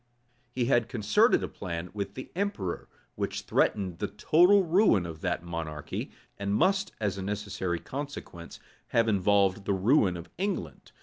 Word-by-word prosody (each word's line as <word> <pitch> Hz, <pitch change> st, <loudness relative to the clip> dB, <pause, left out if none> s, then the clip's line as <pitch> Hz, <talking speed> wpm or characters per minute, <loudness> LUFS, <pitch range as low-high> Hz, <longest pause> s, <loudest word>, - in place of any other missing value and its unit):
He 120 Hz, 0 st, -1 dB
had 120 Hz, -3 st, +2 dB
concerted 105 Hz, -3 st, +3 dB
a -, -, -1 dB
plan 85 Hz, 0 st, -6 dB
with 100 Hz, -1 st, -4 dB
the 130 Hz, -, -8 dB
emperor, 195 Hz, -, -3 dB, 0.2 s
which -, -, -3 dB
threatened 95 Hz, -5 st, 0 dB
the -, -, -1 dB
total 175 Hz, -, +4 dB
ruin 170 Hz, -, +3 dB
of 80 Hz, -2 st, -8 dB
that 90 Hz, -2 st, -1 dB
monarchy, 80 Hz, -3 st, -5 dB, 0.3 s
and 100 Hz, 0 st, -1 dB
must, 195 Hz, -, +2 dB
as 100 Hz, -3 st, -1 dB
a -, -, -3 dB
necessary 100 Hz, -3 st, -2 dB
consequence, 135 Hz, -, -7 dB, 0.3 s
have 115 Hz, -1 st, +2 dB
involved 100 Hz, -1 st, +2 dB
the 100 Hz, -, +1 dB
ruin 95 Hz, -2 st, +3 dB
of 85 Hz, -, -9 dB
England. 180 Hz, -, -3 dB
100 Hz, 150 wpm, -28 LUFS, 90-130 Hz, 0.3 s, total